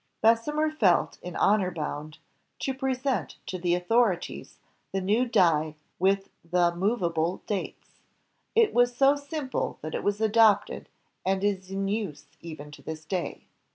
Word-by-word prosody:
Bessemer 295 +8 +2
felt 205 - +2
in 180 -1 -7
honor 200 -3 +3
boimd 155 -2 -5 0.4
to 270 - -2
present 265 -1 -1
to 185 - -5
the 175 0 +2
author 210 +3 +3
ities 175 - -9 0.4
the 195 - -1
new 210 +7 +1
die 160 -9 +3 0.2
with 195 +1 +1
the 175 0 +2
movable 175 -4 0
dates. 200 -3 -5 0.5
It 455 -1 +4
was 245 0 +3
so 275 +2 +5
simple 285 -1 -3
that 155 - -5
it - - -3
was 205 0 0
adopted 220 -2 +3 0.3
and 190 +1 0
is 190 -2 -1
in 195 0 -2
use 195 -8 -3 0.2
even 155 -3 -9
to - - -12
this 155 0 -7
day. 180 +1 -4
195 Hz, 150 wpm, -27 LUFS, 175-240 Hz, 0.5 s, so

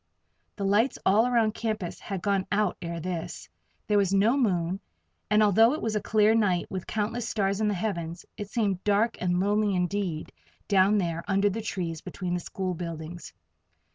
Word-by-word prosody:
The 200 - -4
lights 210 +6 +2
all 215 +5 +4
around 230 -3 +2
the - - -12
campus 215 -6 -3
had 195 -3 -5
gone 200 -2 +1
out 205 -2 +1
ere 170 -1 -4
this. 170 - -5 0.4
There 205 -1 +3
was 195 -2 +1
no 205 +6 +4
moon, 185 -8 +1 0.5
and 210 +1 +4
although 225 +4 +5
it - - -6
was 220 -1 -1
a 210 - 0
clear 215 +1 +3
night, 195 -6 +2
with 185 -2 -5
countless 225 +2 -2
stars 200 -1 0
in 215 - +2
the 205 - +1
heavens, 170 -4 -3
it 205 -1 -6
seemed 200 -5 -1
dark 210 +3 +2
and 180 -1 +1
lonely 205 +1 +2
indeed 180 -3 -2 0.4
down 200 +1 +4
there 170 -3 -1
under 200 0 +2
the 225 - -3
trees 170 -6 -4
between 180 -2 -4
the 180 - 0
school 185 +1 -4
buildings. 165 -1 -7
200 Hz, 185 wpm, -27 LUFS, 180-215 Hz, 0.5 s, although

